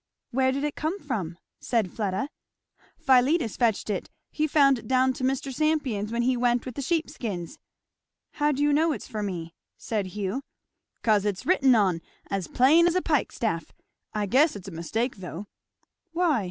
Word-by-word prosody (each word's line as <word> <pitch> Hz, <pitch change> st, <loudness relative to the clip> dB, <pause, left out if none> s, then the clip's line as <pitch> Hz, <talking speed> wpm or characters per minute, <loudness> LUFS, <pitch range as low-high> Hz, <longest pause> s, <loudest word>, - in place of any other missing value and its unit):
"Where 260 Hz, +1 st, +2 dB
did 275 Hz, +2 st, -2 dB
it 295 Hz, -1 st, -1 dB
come 330 Hz, +6 st, -2 dB
from?" 200 Hz, -, -4 dB, 0.2 s
said 225 Hz, -6 st, 0 dB
Fleda. 205 Hz, +4 st, -2 dB, 0.7 s
"Philetus 265 Hz, -, +3 dB
fetched 230 Hz, -4 st, +1 dB
it 205 Hz, -4 st, -3 dB, 0.2 s
he 310 Hz, 0 st, 0 dB
found 280 Hz, -4 st, +4 dB
it -, -, -12 dB
down 260 Hz, 0 st, +3 dB
to 255 Hz, -, -7 dB
Mr. 270 Hz, +1 st, -1 dB
Sampion's 270 Hz, -8 st, 0 dB
when 235 Hz, +1 st, 0 dB
he 255 Hz, +1 st, +2 dB
went 240 Hz, 0 st, +1 dB
with 255 Hz, -, -5 dB
the 280 Hz, -, -4 dB
sheep 325 Hz, +4 st, 0 dB
skins." 225 Hz, -, -5 dB, 0.7 s
"How 295 Hz, 0 st, +1 dB
do 285 Hz, 0 st, 0 dB
you 295 Hz, 0 st, +3 dB
know 315 Hz, +2 st, +3 dB
it's -, -, -7 dB
for 215 Hz, -4 st, -4 dB
me?" 170 Hz, -5 st, -4 dB, 0.2 s
said 210 Hz, -4 st, -2 dB
Hugh. 205 Hz, +6 st, -2 dB, 0.6 s
"'Cause 210 Hz, -3 st, +3 dB
it's 205 Hz, -2 st, -2 dB
written 270 Hz, -8 st, +4 dB
on, 185 Hz, -6 st, +2 dB, 0.3 s
as 195 Hz, -3 st, -1 dB
plain 310 Hz, +7 st, +5 dB
as 345 Hz, -, +1 dB
a 370 Hz, -, +3 dB
pikestaff. 230 Hz, -, -1 dB, 0.4 s
I 210 Hz, -1 st, -1 dB
guess 270 Hz, -, +3 dB
it's 195 Hz, -2 st, -9 dB
a -, -, -6 dB
mistake 215 Hz, +10 st, -2 dB
though." 185 Hz, +1 st, -7 dB, 0.7 s
"Why?" 335 Hz, -6 st, +2 dB
250 Hz, 180 wpm, -26 LUFS, 205-290 Hz, 0.7 s, plain